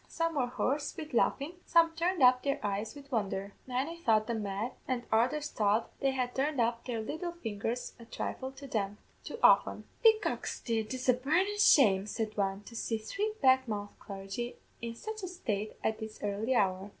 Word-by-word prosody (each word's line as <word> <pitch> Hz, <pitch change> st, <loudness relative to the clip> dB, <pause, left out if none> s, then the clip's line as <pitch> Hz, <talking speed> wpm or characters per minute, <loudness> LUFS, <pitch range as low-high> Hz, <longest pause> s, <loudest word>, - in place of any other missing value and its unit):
Some 330 Hz, 0 st, -1 dB
were 265 Hz, -5 st, +1 dB
hoarse 280 Hz, +4 st, -1 dB
wid 310 Hz, -3 st, -7 dB
laughin'; 280 Hz, +7 st, +1 dB
some 335 Hz, -1 st, +5 dB
turned 340 Hz, -2 st, +1 dB
up 250 Hz, 0 st, +7 dB
their 280 Hz, -1 st, 0 dB
eyes 205 Hz, +4 st, -2 dB
wid 280 Hz, 0 st, -12 dB
wondher; 200 Hz, -3 st, -1 dB, 0.2 s
many 270 Hz, +7 st, -2 dB
thought 220 Hz, -6 st, +3 dB
them 225 Hz, -1 st, -2 dB
mad, 205 Hz, +4 st, -2 dB, 0.2 s
an' 245 Hz, -2 st, -1 dB
others 265 Hz, +7 st, +2 dB
thought 210 Hz, +1 st, +1 dB
they 275 Hz, -, +2 dB
had 255 Hz, -2 st, -1 dB
turned 275 Hz, +1 st, 0 dB
up 230 Hz, 0 st, +1 dB
their 235 Hz, -3 st, -2 dB
little 335 Hz, +9 st, -4 dB
fingers 230 Hz, -5 st, -4 dB
a 230 Hz, -, -11 dB
thrifle 260 Hz, +3 st, -4 dB
too 220 Hz, -, -5 dB
often. -, -, +5 dB, 0.2 s
"'Be 445 Hz, -1 st, +8 dB
goxty, 230 Hz, -, -2 dB
it's 255 Hz, +4 st, -5 dB
a 255 Hz, -, +7 dB
burnin' 350 Hz, +11 st, +1 dB
shame,' 210 Hz, -, +6 dB
said 215 Hz, 0 st, -3 dB
one, 195 Hz, 0 st, -1 dB
'to 230 Hz, -, -12 dB
see 225 Hz, 0 st, -1 dB
three 395 Hz, -, -2 dB
black 260 Hz, -1 st, +5 dB
mouth 205 Hz, -2 st, -3 dB
clargy 195 Hz, +4 st, -5 dB, 0.3 s
in 230 Hz, 0 st, -4 dB
sich 435 Hz, -, -6 dB
a 370 Hz, -, -4 dB
state 215 Hz, -, -3 dB
at 220 Hz, -, 0 dB
this 220 Hz, -1 st, -7 dB
early 210 Hz, +5 st, 0 dB
hour!' 190 Hz, -2 st, +1 dB
245 Hz, 185 wpm, -31 LUFS, 215-285 Hz, 0.3 s, Be